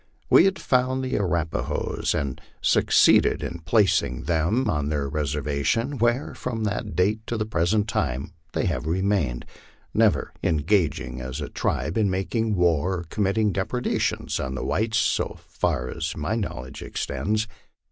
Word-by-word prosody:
We 170 - +8
had 190 0 +2
found 130 0 +1
the 130 - -3
Arapahoes, 85 -5 -1
and 70 -3 -3 0.2
succeed - - +5
ed - - -2
in 85 - -4
placing 90 - +2
them 85 +10 +1
on 75 -7 0
their 70 -2 -1
reservation, 75 - -1
where, 120 +4 +1
from 115 -3 -4
that 105 0 -2
date 100 +5 +2
to 120 - -2
the 105 - -1
present 105 +2 +1
time, 70 - -2 0.2
they - - 0
have 75 - -1
remained, 90 -8 0 0.5
never - - +2
engaging 75 - +1
as 65 +3 -5
a 75 - -4
tribe 75 - -1
in 105 -2 +3
making 105 +4 0
war 90 +1 +2
or - - -8
com 105 - 0
mitting 105 +1 +2
depredations 125 +6 -1
on 65 0 -3
the 65 - -3
whites, 110 0 0
so - - 0
far 60 - -1
as 80 -1 -4
my 75 +7 -1
knowledge 65 - -5
extends. 110 +2 -2
90 Hz, 155 wpm, -25 LUFS, 75-110 Hz, 0.5 s, We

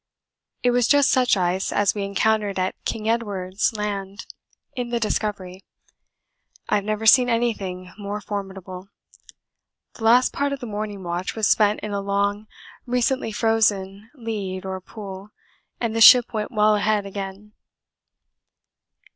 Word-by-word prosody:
It 245 - +3
was 245 -1 +2
just 285 -2 +4
such 250 -4 +3
ice 180 +1 0
as 205 -1 +2
we 205 - -4
encountered 205 0 0
at 185 0 0
King 215 -1 -3
Edward's 205 -4 -1
Land 200 -1 -4 0.5
in 245 -2 -3
the 235 -1 -1
Discovery. 200 -4 -3 1.0
I - - +2
have 200 - -3
never 215 +1 -2
seen 245 +2 +6
anything 195 -6 -2
more 205 +1 -4
formidable. 195 -2 -7 1.0
The 225 - -11
last 245 +3 +5
part 285 0 -1
of 280 - -5
the 250 - -7
morning 205 -2 -5
watch 175 +1 -3
was 220 -2 +1
spent 210 -1 +3
in 210 - -5
a 200 - -1
long 200 +1 -1 0.4
recently 250 -1 0
frozen 210 -2 0
lead 205 -7 -5
or 190 0 -5
pool, 195 0 -9 0.5
and 230 -2 -2
the 225 - 0
ship 245 0 +8
went 215 +1 -3
well 215 -2 +3
ahead 210 0 0
again. 195 +1 -7
210 Hz, 145 wpm, -23 LUFS, 195-225 Hz, 1.0 s, ship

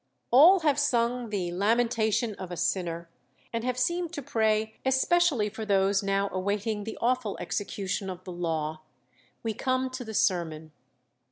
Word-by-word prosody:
All 335 +10 +7
have 295 -3 +2
sung 245 -3 +1
'the 185 -4 -2
Lamentation 220 +3 +1
of 185 - -6
a 175 - -6
Sinner,' 170 -2 -1 0.5
and 230 0 -2
have 250 0 -1
seemed 345 +6 0
to 290 - -5
pray 220 -1 0
'especially 265 -2 +2
for 220 +2 -6
those 195 -1 +2
now 195 0 0
awaiting 205 +2 -2
the 225 - -6
awful 245 -3 0
execution 195 -1 -3
of 185 0 -7
the 185 - -8
law.' 160 -3 -2 0.6
We 225 -1 -1
come 255 +3 -1
to 255 0 -5
the 220 -2 -7
sermon. 160 -5 0
220 Hz, 155 wpm, -28 LUFS, 190-250 Hz, 0.6 s, All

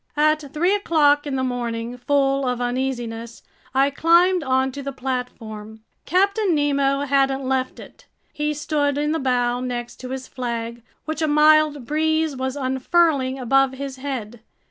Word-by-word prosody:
At 305 -1 +2
three 345 +6 +1
o'clock 295 -7 +2
in 275 - -2
the 260 - -1
morning, 240 -2 -3
full 275 +2 +1
of 250 -1 -1
uneasiness, 240 -2 -3 0.3
I 270 +2 +2
climbed 345 +5 +4
onto 265 0 0
the 275 0 -4
platform. 225 -5 -6 0.3
Captain 395 +1 +2
Nemo 280 -1 +1
hadn't 275 -1 +1
left 260 -1 -1
it. - - -14 0.3
He 300 0 -2
stood 290 -1 0
in 295 +1 0
the 320 - 0
bow 245 -2 0
next 245 -1 -5
to 255 - -8
his 260 0 -5
flag, 235 -2 -5 0.2
which 315 0 -4
a 315 - +2
mild 300 -2 +4
breeze 315 +1 0
was 260 +1 -3
unfurling 265 0 +1
above 270 +1 +2
his 270 0 -6
head. 250 -5 -5
270 Hz, 150 wpm, -22 LUFS, 250-300 Hz, 0.3 s, climbed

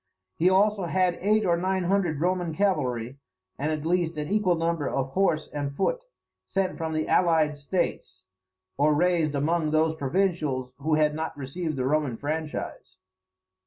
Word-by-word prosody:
He 165 - -1
had 185 - +6
also 200 -1 +2
eight 185 +4 +1
or 170 - +3
nine 185 +1 0
hundred 175 -5 +1
Roman 175 -2 0
cavalry, 135 - -1 0.4
and 150 +3 0
at 155 -1 -3
least 170 -1 0
an 150 +1 -3
equal 205 -4 +2
number 165 -3 -1
of 135 -1 -1
horse 160 -2 +1
and 140 -1 -3
foot - - -1 0.4
sent 195 -1 -1
from 160 -1 -2
the 155 0 -1
allied 160 -4 +3
states, 140 - -3 0.5
or 150 +1 +3
raised 165 -2 +2
among 155 +3 +1
those 155 +1 +2
provincials 150 -5 -1
who 155 +2 +1
had 150 -1 +3
not 160 -1 -4
received 155 +4 -4
the 130 -1 -1
Roman 140 -4 0
franchise. 150 -8 -5
160 Hz, 160 wpm, -26 LUFS, 145-180 Hz, 0.5 s, had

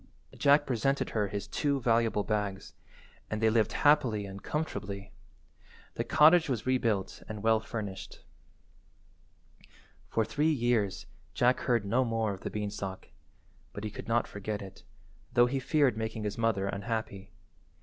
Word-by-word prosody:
Jack 145 +1 +4
presented 135 +2 0
her 105 -2 0
his 100 0 -5
two 140 +6 0
valuable 115 -3 +2
bags, 105 -3 -3 0.6
and 110 - -2
they 110 0 +3
lived 110 -2 +2
happy 125 -9 +4
and 100 0 -8
comfortably. 100 -10 -4 0.8
The 115 - -2
cottage 155 +5 +5
was 120 -5 -2
rebuilt 115 -7 0
and 105 -1 -6
well 110 0 +4
furnished. 105 -3 -7 1.9
For 110 - +1
three 150 +8 +1
years 120 -8 0 0.3
Jack 125 +1 +3
heard 120 -4 +1
no 120 +6 +2
more 115 -3 0
of 95 - -10
the - - -4
beanstalk, 100 -2 -5 0.6
but 100 - -7
he 105 - -3
could - - -8
not 115 0 +2
forget 105 0 -5
it, 95 - -11 0.5
though 120 0 +6
he 135 +2 -1
feared 140 -2 +2
making 110 0 -4
his 105 -1 -2
mother 115 -4 +1
unhappy. 100 -1 -4
110 Hz, 145 wpm, -30 LUFS, 100-125 Hz, 1.9 s, though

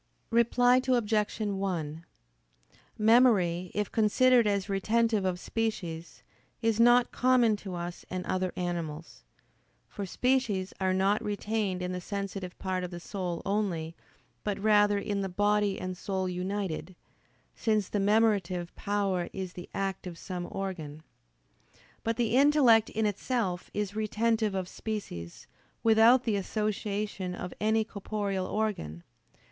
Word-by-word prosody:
Reply 245 +2 +4
Obj. 220 -4 +1
1: 185 -7 -2 0.9
Memory, 210 -6 +4
if 210 -1 -1
considered 235 +2 +4
as 200 -2 0
retentive 215 +1 +1
of 180 -1 -1
species, 175 -8 -4 0.4
is 225 -1 +1
not 240 +1 +5
common 245 -3 +3
to 195 -3 -7
us 175 0 -6
and 180 0 -4
other 185 -1 -1
animals. 170 -3 -4 0.6
For 200 -2 -6
species 230 -5 0
are 185 -1 +1
not 195 +2 +2
retained 205 -2 -2
in 180 - -2
the 180 0 -4
sensitive 195 -1 -5
part 185 -1 -2
of 180 - -4
the 175 -1 -7
soul 180 -1 -4
only, 180 -6 -1 0.5
but 205 -2 -1
rather 205 0 +4
in 200 0 -2
the 195 - -2
body 205 +1 +1
and 185 0 -4
soul 190 0 -2
united: 185 -1 -3 0.6
since 215 -3 0
the 205 - -2
memorative 195 -4 +2
power 200 -4 -1
is 190 -2 -5
the 180 - -9
act 195 -1 -3
of 170 -2 -7
some 180 -1 -5
organ. 160 -6 -5 1.0
But 230 0 -1
the 235 -1 +1
intellect 265 -6 +5
in 220 0 -1
itself 205 -3 -1
is 205 -1 -3
retentive 220 -1 0
of 185 -1 -2
species, 185 - -6 0.4
without 225 +3 +6
the 220 -4 0
association 205 -2 -2
of 180 - -6
any 220 +1 +3
corporeal 200 -3 -3
organ. 190 - -2
200 Hz, 130 wpm, -29 LUFS, 185-220 Hz, 1.0 s, without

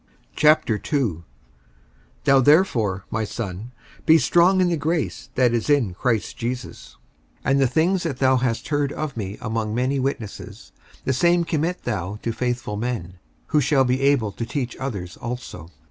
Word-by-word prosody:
55:002:001 130 - +2 1.0
Thou 135 0 +5
therefore, 120 - +3
my 110 - -1
son, 105 +1 -5 0.4
be 160 - +8
strong 175 +3 +4
in 180 -1 +3
the 170 - +1
grace 160 +1 -2
that 125 -2 +3
is 120 +4 -1
in 135 -11 +3
Christ 115 +2 -1
Jesus. 125 +1 -6 0.5
55:002:002 - - +2
And 140 0 +3
the 135 - +4
things 165 +8 +1
that 160 -7 -3
thou 130 -1 +3
hast 125 -2 -1
heard 145 -2 0
of 155 -2 -4
me 100 -2 -5
among 110 -1 -2
many 130 +3 0
witnesses, 130 -6 -5 0.3
the 130 - +1
same 170 +6 +3
commit 165 +2 -2
thou 95 +4 -3
to 115 - -1
faithful 120 -3 -2
men, 105 -6 -4 0.3
who 150 - +3
shall 135 0 +3
be 130 +1 0
able 135 -7 +2
to 115 - -5
teach 125 +1 -3
others 100 -10 -5
also. 120 -9 -7
125 Hz, 160 wpm, -23 LUFS, 110-145 Hz, 1.0 s, be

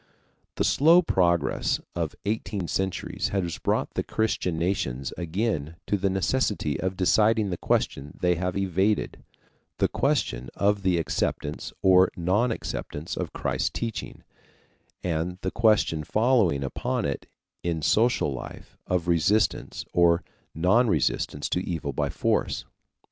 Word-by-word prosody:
The - - 0
slow 165 +5 +5
progress 85 - +1 0.2
of - - -2
eighteen 105 -3 -2
centuries 95 +1 -2
has 90 -5 -2
brought - - 0
the - - 0
Christian 110 -6 -1
nations 75 -7 -1
again 85 -3 -2
to - - +1
the 100 0 0
necessity 95 - 0
of 95 0 -2
deciding 105 +2 +3
the 90 - -2
question 70 -2 -1
they 90 0 +3
have 90 +2 -2
evaded 95 +2 0 0.6
the - - +3
question - - 0
of 100 0 +2
the 95 -2 +2
acceptance 80 - -2
or 95 0 +6
non 100 +8 +2
acceptance 80 -7 -5
of - - -3
Christ's - - -1
teaching, 115 -2 -5 0.8
and 90 +1 -1
the 95 - -2
question 105 -9 +2
following 105 - +2
upon 65 - -2
it - - -3 0.3
in 85 -3 -2
social 110 - +2
life 65 - -9
of 90 -2 0
resistance 90 +6 +1
or 85 0 +4 0.3
non 95 +10 +3
resistance 75 - 0
to 90 - 0
evil 80 -6 -3
by - - -1
force. - - 0
90 Hz, 130 wpm, -26 LUFS, 85-105 Hz, 0.8 s, or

